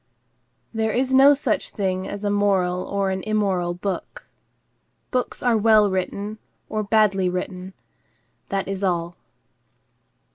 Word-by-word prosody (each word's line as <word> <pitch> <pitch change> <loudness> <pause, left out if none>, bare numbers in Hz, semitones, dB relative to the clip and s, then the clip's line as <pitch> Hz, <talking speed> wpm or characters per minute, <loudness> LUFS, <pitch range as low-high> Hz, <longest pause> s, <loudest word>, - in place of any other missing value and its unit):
There 220 0 0
is 260 +3 0
no 275 +2 +7
such 270 -5 -1
thing 190 -2 -2
as 205 0 -6
a 205 - 0
moral 190 -3 +1
or 200 -1 -1
an 190 0 -2
immoral 190 -4 0
book. 190 +1 -5 0.9
Books 255 -1 -2
are 245 -2 +3
well 215 -2 +4
written, 200 +3 -3 0.3
or 215 - -1
badly 205 -3 +2
written. 185 +1 -5 0.8
That 195 -1 -2
is 195 0 -4
all. 175 -2 -1
200 Hz, 130 wpm, -23 LUFS, 185-215 Hz, 0.9 s, no